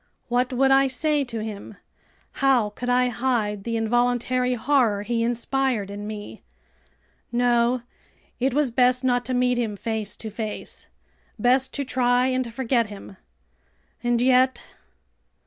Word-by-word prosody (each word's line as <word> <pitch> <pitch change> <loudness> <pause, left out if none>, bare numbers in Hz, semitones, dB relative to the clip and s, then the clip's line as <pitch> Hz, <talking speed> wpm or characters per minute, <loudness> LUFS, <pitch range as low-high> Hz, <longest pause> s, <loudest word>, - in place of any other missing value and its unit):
What 245 +1 +1
would 270 +1 +2
I 270 0 +5
say 295 +3 +1
to 230 -3 -5
him? 210 -1 -7 0.7
How 255 -6 +3
could 245 +4 -5
I 250 0 +3
hide 220 -5 -1
the 230 -1 -1
involuntary 245 +2 +1
horror 235 -5 +2
he 230 +2 -1
inspired 240 -2 -1
in 205 +1 -6
me? 210 -1 -8 0.9
No! 240 0 +2 0.6
It 265 +2 +1
was 280 -1 +1
best 250 +1 +3
not 245 -1 +2
to 255 - -1
meet 250 0 +2
him 220 -4 -2
face 220 -1 -3
to 220 - -7
face! 215 0 -6 0.5
Best 250 +4 +2
to 280 - -1
try 250 -2 +2
and 255 -2 -1
forget 235 -1 0
him! 200 -2 -11 0.9
And 240 -1 +1
yet.. 255 +1 +3
245 Hz, 140 wpm, -24 LUFS, 225-255 Hz, 0.9 s, I